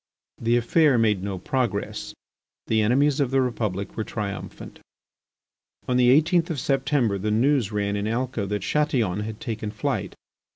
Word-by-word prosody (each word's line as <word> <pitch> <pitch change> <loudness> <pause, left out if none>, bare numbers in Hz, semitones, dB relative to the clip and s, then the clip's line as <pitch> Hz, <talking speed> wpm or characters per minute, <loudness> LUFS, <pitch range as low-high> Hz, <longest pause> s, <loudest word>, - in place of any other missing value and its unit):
The 115 +1 +2
affair 140 +3 +3
made 105 -4 +2
no 100 -1 -3
progress. 120 -1 -2 0.5
The 110 -1 +2
enemies 135 +6 +2
of 140 -3 +1
the 135 +1 +2
Republic 110 -6 -2
were 110 - -2
triumphant. 105 -3 -6 1.1
On 125 - +1
the 125 -1 +5
eighteenth 165 +5 +4
of 155 -5 -2
September 135 -6 +1
the 105 +3 -2
news 120 0 +2
ran 100 -1 -1
in 105 +1 -2
Alca 115 -2 -2
that 105 0 -3
Chatillon 130 - 0
had 105 0 -5
taken 110 -2 -4
flight. 105 0 -3
115 Hz, 155 wpm, -24 LUFS, 105-135 Hz, 1.1 s, the